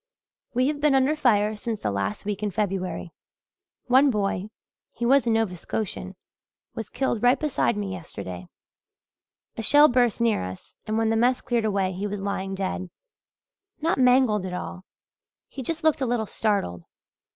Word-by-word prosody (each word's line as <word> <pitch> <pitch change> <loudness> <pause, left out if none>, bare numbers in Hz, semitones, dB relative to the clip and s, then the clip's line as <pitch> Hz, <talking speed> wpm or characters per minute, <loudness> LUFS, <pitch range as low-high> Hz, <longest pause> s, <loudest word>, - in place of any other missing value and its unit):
"We 250 +1 +3
have 295 -1 -3
been 295 -2 +4
under 270 +3 +3
fire 215 -7 +2
since 220 0 -4
the 105 - -1
last 100 - -3
week 205 -1 -3
in 210 - 0
February. 190 -3 -3 0.7
One 265 +3 +5
boy 205 -3 -1 0.4
he 240 - -4
was 265 0 +4
a - - +3
Nova 225 -5 +1
Scotian 190 +1 -4 0.6
was 225 -3 -6
killed 255 -5 -1
right 245 +2 +4
beside 285 -7 0
me 200 -2 -3
yesterday. 95 - -7 1.1
A - - -2
shell 290 +6 +6
burst 245 -3 +2
near 230 - +2
us 95 0 -9
and 215 +1 0
when 225 0 +2
the - - +2
mess 245 +3 +3
cleared 235 -2 0
away 195 -3 +1
he 190 +3 -3
was 205 0 -4
lying 195 -1 -3
dead 185 -1 -3 0.9
not 325 -2 0
mangled 250 -5 +4
at 185 -1 -5
all 185 +1 -6 0.6
he 270 - -8
just 315 +6 -4
looked 315 -3 +3
a 260 - +1
little 235 -2 0
startled. 195 - -1
215 Hz, 170 wpm, -25 LUFS, 195-250 Hz, 1.1 s, shell